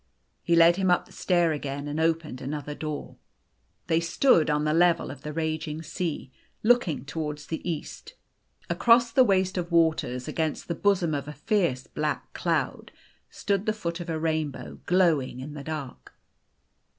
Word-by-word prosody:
He 170 - +2
led 170 +1 +6
him 190 -1 +1
up 180 - +3
the - - -20
stair 175 -3 +2
again, 145 -1 -4
and 145 +2 -3
opened 160 -5 0
another 145 +1 -4
door. 150 0 -6 0.7
They 160 - +2
stood 170 - +3
on 150 0 +1
the 150 0 +1
level 170 -2 +3
of 135 -1 -10
the 150 - -5
raging 160 0 -3
sea, 160 -4 -4 0.3
look 245 -1 +4
ing 150 -4 -3
towards 150 0 -4
the 160 - -4
east. 165 - -6 0.5
Across 235 0 +4
the 260 +2 +6
waste 190 -4 +2
of 175 0 -5
waters, 160 -7 +1
against 160 -2 -2
the 170 - -1
bosom 180 -3 +1
of 140 -1 -3
a 150 - -6
fierce 150 - 0
black 150 -1 -3
cloud, - - -1 0.4
stood 200 +1 -2
the 215 - +2
foot 170 -5 -4
of 175 0 -6
a 160 - -1
rainbow, 155 -3 -3
glowing 165 -9 +2
in 145 +3 -7
the 145 -2 -7
dark. 155 -5 -6
160 Hz, 170 wpm, -27 LUFS, 150-175 Hz, 0.7 s, led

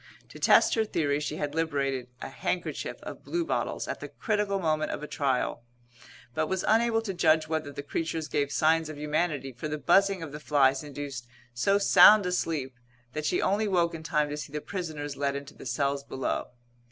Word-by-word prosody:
To - - -12
test - - +5
her 225 - +2
theory 145 -8 0
she 150 0 -3
had 145 -1 -3
liberated 140 -5 -1 0.2
a - - -5
handkerchief - - -3
of - - -8
bluebottles 345 -1 -2
at - - -4
the - - -6
critical 210 -3 -1
moment 155 -3 0
of - - -4
a - - -5
trial, 135 -5 -1 0.7
but 155 +2 0
was 190 -1 -1
unable 225 0 +3
to 200 -4 -3
judge 155 -3 +3
whether 155 -2 -2
the 140 - -7
creatures 160 +1 -3
gave 145 -1 -1
signs 160 +2 +2
of 155 - -7
humanity 150 -2 -1
for 125 +5 -6
the 150 0 -3
buzzing 195 +3 +3
of 155 - -7
the 150 - -7
flies 140 -3 +3
induced 140 -3 -6 0.3
so 195 +12 +2
sound 205 0 +7
a 180 - -1
sleep 140 -8 -2 0.3
that 155 0 -2
she - - +1
only 205 +3 +1
woke 175 -4 +2
in 165 - -6
time 150 -2 +1
to 150 - -4
see 150 - -7
the 150 - -3
prisoners 150 -6 -5
led 140 0 0
into 140 +1 -7
the - - -10
cells 140 +3 0
below. 135 -1 -3
155 Hz, 200 wpm, -28 LUFS, 140-175 Hz, 0.7 s, sound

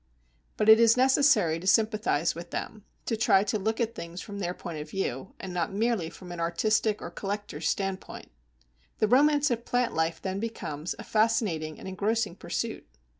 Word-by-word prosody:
But 215 - +1
it 220 0 +9
is 230 +1 +5
necessary 255 - +4
to 185 - -7
sympathize 215 -6 +2
with 170 +1 -9
them, 215 +3 -6 0.2
to 230 - 0
try 200 -3 +4
to 210 +1 -1
look 220 +3 -1
at 230 -1 0
things 170 +1 -7
from 200 +1 -7
their 180 -2 -2
point 165 -3 -6
of 150 0 -7
view, 190 -4 -4
and 190 -2 -6
not 175 +1 -1
merely 210 -4 0
from 180 +1 -11
an 175 - -6
artistic 210 +5 +1
or - - -6
collector's 200 -6 -3
standpoint. 195 -1 -4 0.7
The 215 - +2
romance 290 +4 +4
of 235 -1 -1
plant 245 -1 0
life 160 +1 0
then 190 0 -3
becomes 180 -8 -4
a - - -8
fascinating 215 -9 0
and - - -9
engrossing 205 0 -1
pursuit. - - -4
200 Hz, 180 wpm, -28 LUFS, 170-225 Hz, 0.7 s, it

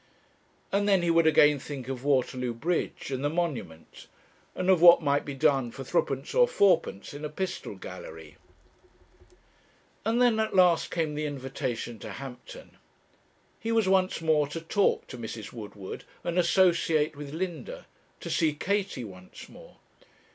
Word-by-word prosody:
And 205 +1 +1
then 190 -3 +4
he 170 - +2
would 165 -1 +4
again 150 -2 +5
think 135 -2 -7
of 130 -1 -5
Waterloo 130 -3 0
Bridge, 160 +1 -2
and 130 0 -3
the 145 - +1
Monument, 150 - -4 0.5
and 185 - -2
of 185 -3 +4
what 170 -1 +8
might 145 0 +1
be 145 - -5
done 135 -2 +2
for 135 +3 -8
threepence 135 +2 -1
or - - +5
fourpence 195 - +1
in 145 +1 -8
a 150 - -3
pistol 185 +4 -4
gallery. - - -10 1.7
And 230 +2 +1
then 240 -3 +4
at 220 -2 -1
last 180 -3 +4
came 160 -3 -1
the 150 0 -2
invitation 130 -4 -4
to - - -8
Hampton. 135 - -10 0.8
He 225 - -3
was 225 -3 +2
once 190 -2 +2
more 155 -2 +2
to 150 +3 -5
talk 195 +5 +1
to 125 - -10
Mrs. 110 -2 -7
Woodward, 105 -4 -8 0.2
and 175 +1 0
associate 170 -4 +3
with 145 -1 -8
Linda 185 - -5 0.4
to - - -6
see 155 -3 +1
Katie 195 -5 -2
once 90 -4 -12
more. - - -15
155 Hz, 155 wpm, -28 LUFS, 135-185 Hz, 1.7 s, what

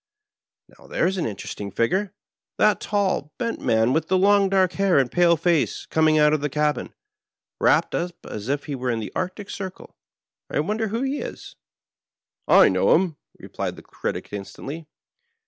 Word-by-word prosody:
" - - -70
Now, - - -19
there's 190 +3 0
an 175 - -1
interesting 105 -1 -6
figure 180 - 0 0.2
— - - -57
^that 215 -1 +4
tall, 190 -8 -1
bent 230 -2 -2
man 115 +2 +2
with 160 +1 0
the 190 - +2
long 200 +1 +4
dark 190 -2 +2
hair 195 -4 +2
and 130 -3 +2
pale 170 0 +4
face, 170 -3 0
coming 155 -1 +3
out 150 0 +5
of 155 - +1
the 150 - -1
cabin, 150 +1 -1 0.6
wrapped - - +3
up 175 0 -2
as 105 +3 -6
if 145 +1 -1
we 145 - -4
were 130 -1 -3
in 115 -2 0
the 110 - -6
Arctic 185 +2 -4
Circle. 190 -2 -8 0.5
I - - -1
wonder 215 +7 -1
who 230 +5 -2
he 270 +2 -1
is." - - -8 0.9
"I - - +7
know - - +3
him," 175 -5 0 0.2
replied - - -5
the - - -13
Critic - - -5
instantly. 140 +10 -7
170 Hz, 180 wpm, -23 LUFS, 140-195 Hz, 0.9 s, I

